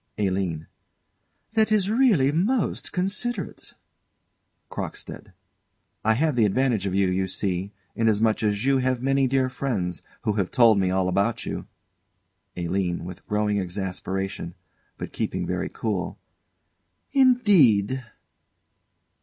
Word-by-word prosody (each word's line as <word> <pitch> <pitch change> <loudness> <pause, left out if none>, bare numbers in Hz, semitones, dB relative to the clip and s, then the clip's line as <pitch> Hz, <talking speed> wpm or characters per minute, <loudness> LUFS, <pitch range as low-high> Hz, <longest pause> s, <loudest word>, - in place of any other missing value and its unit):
ALINE. 95 -6 -1 0.9
That 220 -1 +2
is 205 -3 +3
really 220 - +4
most 200 - 0
considerate! 195 +4 -3 1.0
CROCKSTEAD. - - -7 0.7
I 110 +1 +3
have 150 +3 +1
the 115 -3 +4
advantage 115 -2 +1
of 95 - -2
you, 100 -1 +3
you 95 +1 0
see, 95 0 -2 0.2
inasmuch 110 -1 +2
as 105 +1 0
you 135 -1 +3
have 130 -1 0
many 135 0 +2
dear 130 0 +2
friends, 120 -10 -3 0.2
who 105 - +1
have 100 -3 -1
told 115 -5 +5
me 95 -1 +1
all 95 0 +1
about 100 +5 0
you. - - -5 0.9
ALINE. 90 0 -1
[With 90 0 -10
growing 105 -1 +1
exasperation, 95 -1 -4 0.4
but - - -7
keeping - - -2
very - - -2
cool.] 100 -6 -3 0.9
Indeed? 175 - +4
110 Hz, 120 wpm, -25 LUFS, 95-135 Hz, 1.0 s, told